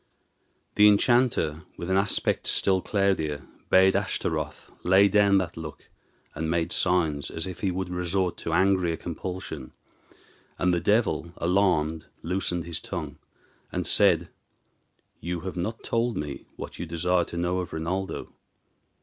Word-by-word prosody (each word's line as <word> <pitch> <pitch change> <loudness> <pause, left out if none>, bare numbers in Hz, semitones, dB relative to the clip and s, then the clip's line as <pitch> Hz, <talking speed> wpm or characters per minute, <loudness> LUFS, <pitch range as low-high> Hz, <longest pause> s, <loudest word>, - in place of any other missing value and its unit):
The 105 0 +6
enchanter, 105 - +3 0.2
with 85 - -5
an - - +3
aspect 100 +1 +1
still 95 -1 +3
cloudier, 95 -9 0 0.2
bade 95 0 +5
Ashtaroth 100 -1 -2
lay 95 +3 +5
down 100 -1 +4
that 90 -3 -1
look, 80 -2 -9 0.4
and 80 +1 -3
made 85 0 0
signs 80 -6 +1
as 80 - -4
if 95 -2 -7
he 100 - 0
would 95 0 -3
resort 90 +1 0
to 80 - -4
angrier 90 -1 +2
compulsion; 85 -5 -6 0.8
and 90 0 +2
the 85 - +2
devil, 105 -4 +1
alarmed, 85 -4 +1 0.2
loosened 90 -1 -1
his 85 0 -4
tongue, 75 -6 -6 0.5
and - - -2
said, - - +4 0.9
"You 85 0 -4
have 95 +1 -5
not 105 +6 -4
told 115 0 0
me 75 -2 -5
what - - -8
you 85 - -4
desire 85 +2 +1
to 85 - -7
know 90 +2 0
of 90 - -4
Rinaldo." 90 +4 -3
90 Hz, 140 wpm, -26 LUFS, 80-95 Hz, 0.9 s, The